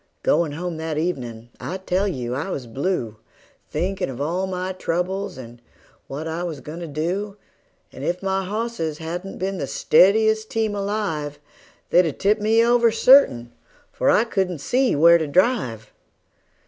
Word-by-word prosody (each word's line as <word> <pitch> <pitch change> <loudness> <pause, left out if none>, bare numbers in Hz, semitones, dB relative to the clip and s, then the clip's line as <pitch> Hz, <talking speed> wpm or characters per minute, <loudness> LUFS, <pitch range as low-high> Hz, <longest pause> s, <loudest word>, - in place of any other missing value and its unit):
Goin' 160 -4 +2
home 175 +1 -4
that 160 -1 -3
evenin' 120 -9 -3
I 185 - -4
tell 190 +1 0
you 125 -9 -3
I 145 +9 -3
was 135 -8 -4
blue, 120 - -2 0.5
Thinkin' 190 -2 -2
of 130 -1 -7
all 175 +6 -1
my 185 0 -3
troubles, 185 +2 -2
and 120 -2 -11 0.5
what 150 +4 -5
I 160 +2 -3
was 165 -5 -4
goin' 155 +4 -8
to 170 - -6
do; 180 +7 -3 0.5
And - - -9
if 180 +2 -2
my 190 0 0
hosses 200 -6 -3
hadn't 175 +4 -6
been 190 0 -3
the 140 - -3
steadiest 220 +8 +3
team 220 -2 -1
alive, 195 -8 -2 0.5
They'd 175 -2 +4
've - - -17
tipped 210 +2 +2
me 225 +2 +4
over, 235 -1 +4
certain, 225 - +5 0.4
for - - 0
I 215 - +5
couldn't 190 -6 -1
see 250 - +1
where 170 +3 +6
to 160 - -2
drive. 145 - 0
180 Hz, 160 wpm, -22 LUFS, 150-200 Hz, 0.5 s, where